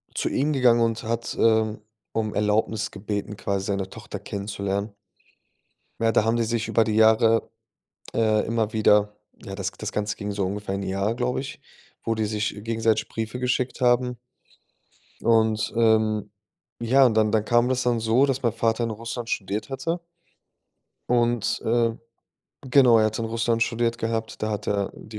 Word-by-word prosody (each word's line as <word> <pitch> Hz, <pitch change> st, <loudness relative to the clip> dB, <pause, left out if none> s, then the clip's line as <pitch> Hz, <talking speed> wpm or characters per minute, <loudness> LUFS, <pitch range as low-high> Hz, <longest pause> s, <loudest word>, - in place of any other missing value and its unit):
zu -, -, -1 dB
ihm 150 Hz, +3 st, 0 dB
gegangen 125 Hz, -3 st, +4 dB
und 115 Hz, -1 st, 0 dB
hat, 115 Hz, +1 st, -3 dB
ähm, 110 Hz, -1 st, +2 dB, 0.3 s
um 110 Hz, -1 st, -1 dB
Erlaubnis 105 Hz, 0 st, 0 dB
gebeten, 105 Hz, +1 st, -4 dB
quasi 100 Hz, -1 st, -2 dB
seine 100 Hz, -2 st, -2 dB
Tochter -, -, -8 dB
kennenzulernen. 100 Hz, 0 st, -4 dB, 1.1 s
Ja, 115 Hz, 0 st, +3 dB
da 110 Hz, -, +3 dB
haben 115 Hz, +1 st, +1 dB
die 120 Hz, -, +1 dB
sich 115 Hz, 0 st, -1 dB
über 115 Hz, -, +3 dB
die 110 Hz, -, -2 dB
Jahre, 110 Hz, +1 st, +4 dB, 0.6 s
äh, 110 Hz, -2 st, +2 dB
immer 110 Hz, -2 st, -1 dB
wieder 105 Hz, -1 st, +3 dB, 0.3 s
ja, 95 Hz, -, -7 dB
das 100 Hz, 0 st, -3 dB
g 95 Hz, -, -23 dB
das 105 Hz, -1 st, -4 dB
Ganze 105 Hz, 0 st, -2 dB
ging 105 Hz, -1 st, -5 dB
so 100 Hz, -1 st, -1 dB
ungefähr 100 Hz, +1 st, -3 dB
'n 100 Hz, -, -4 dB
Jahr, 100 Hz, +4 st, -1 dB
glaube 125 Hz, 0 st, -1 dB
ich, 145 Hz, +3 st, -8 dB, 0.4 s
wo 115 Hz, -, 0 dB
die 110 Hz, -1 st, -1 dB
sich 105 Hz, 0 st, -1 dB
gegenseitig 115 Hz, -1 st, 0 dB
Briefe 110 Hz, +2 st, -5 dB
geschickt 125 Hz, 0 st, -1 dB
haben. 125 Hz, 0 st, +2 dB, 1.0 s
Und, 110 Hz, -2 st, +2 dB
ähm, 110 Hz, -2 st, +2 dB, 0.5 s
ja, 130 Hz, +3 st, +4 dB
dann 110 Hz, -1 st, +2 dB
dann 110 Hz, -1 st, +2 dB
kam 120 Hz, +2 st, +3 dB
das 130 Hz, -1 st, +1 dB
dann 120 Hz, -1 st, +1 dB
so, 115 Hz, +5 st, +3 dB
dass 135 Hz, -1 st, -2 dB
mein 120 Hz, -, +2 dB
Vater 115 Hz, 0 st, 0 dB
in 115 Hz, -, -1 dB
Russland 115 Hz, +2 st, -6 dB
studiert 105 Hz, +3 st, -3 dB
hatte 145 Hz, +6 st, -2 dB, 1.1 s
und, 120 Hz, -2 st, +1 dB
äh 115 Hz, 0 st, +2 dB, 0.8 s
genau, 125 Hz, -3 st, +6 dB
er 110 Hz, -, +4 dB
hatte 110 Hz, +2 st, -2 dB
in 115 Hz, -, -3 dB
Russland 115 Hz, 0 st, 0 dB
studiert 115 Hz, 0 st, 0 dB
gehabt, 115 Hz, -1 st, -3 dB
da 110 Hz, -, 0 dB
hat 105 Hz, -1 st, -4 dB
er 100 Hz, -1 st, 0 dB
die 110 Hz, 0 st, -10 dB
110 Hz, 170 wpm, -24 LUFS, 105-120 Hz, 1.1 s, genau